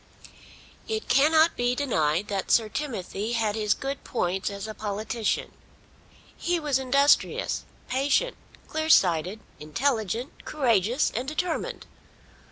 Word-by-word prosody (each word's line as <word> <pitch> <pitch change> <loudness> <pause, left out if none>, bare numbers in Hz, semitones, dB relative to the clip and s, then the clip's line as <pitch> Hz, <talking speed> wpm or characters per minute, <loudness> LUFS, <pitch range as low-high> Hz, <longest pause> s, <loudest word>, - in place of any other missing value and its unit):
It 440 0 -3
cannot 315 +5 +4
be 245 0 +1
denied 185 - 0
that 195 -3 -3
Sir 225 -2 +4
Timothy 220 -5 -4
had 220 -3 +1
his 210 -1 +1
good 275 0 -5
points 190 -4 -1
as 200 +1 -6
a 215 - -5
politician. 215 +2 -2 0.8
He 350 0 -1
was 290 -4 +1
industrious, 275 +2 +2 0.2
patient, 285 - +1 0.3
clear 315 0 -2
sighted, 180 - +3 0.2
intelligent, 225 - -2
courageous, 240 -3 +1
and 245 +4 -2
determined. 320 +3 -3
240 Hz, 115 wpm, -26 LUFS, 205-285 Hz, 0.8 s, cannot